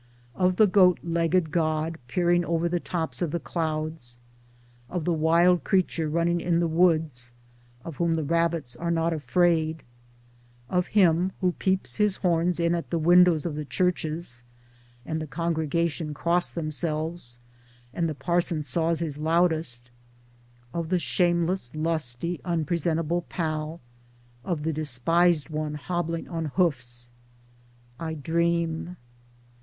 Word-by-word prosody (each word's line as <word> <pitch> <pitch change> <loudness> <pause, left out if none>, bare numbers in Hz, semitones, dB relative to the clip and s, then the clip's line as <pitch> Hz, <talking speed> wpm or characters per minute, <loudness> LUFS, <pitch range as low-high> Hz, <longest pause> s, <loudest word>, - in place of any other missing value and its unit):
Of 185 -1 +1
the 215 - +6
goat 185 -2 +5
legged 170 0 +1
God 160 0 0
peering 175 +3 +2
over 170 0 0
the 175 +1 0
tops 165 -1 -3
of 175 - +1
the 170 - -2
clouds; 155 -7 -4 0.7
of 175 -4 -3
the 175 - +2
wild 170 +3 +3
creature 180 -5 +1
running 170 +2 +1
in 170 -1 +1
the 170 - +2
woods 160 -8 +1 0.5
of 165 -5 -7
whom 170 -1 +1
the 160 - -1
rabbits 165 -4 0
are 170 - -3
not 165 0 +1
afraid; 160 -1 +1 0.9
of 180 -1 +1
him 180 0 +4
who 185 -2 +2
peeps 190 +1 -1
his 210 -2 +3
horns 175 -1 +1
in 170 0 +2
at 170 -1 -3
the 170 - 0
windows 175 0 +5
of 170 - -2
the 150 +1 -4
churches, 160 -5 -2 0.6
and 160 0 -3
the 155 - -5
congregation 165 -1 -1
cross 170 +3 +1
themselves 155 -4 -2 0.5
and 170 -1 0
the 155 - -4
parson 170 +2 0
saws 165 +4 0
his 150 -3 -3
loudest; 160 -7 +1 0.8
of 170 -1 -3
the 185 - +2
shame 175 -1 +1
less 170 -7 -2
lusty 155 0 -1
unpresentable 165 0 0
pal; 155 -1 -3 0.6
of 165 -5 -2
the 160 +1 -1
despised 155 +3 +2
one 155 -1 -3
hobbling 165 +1 -3
on 165 -2 -3
hoofs 125 -9 0 0.4
— 120 0 -31
I 160 -1 -4
dream. 170 +2 -1
165 Hz, 140 wpm, -26 LUFS, 155-175 Hz, 0.9 s, the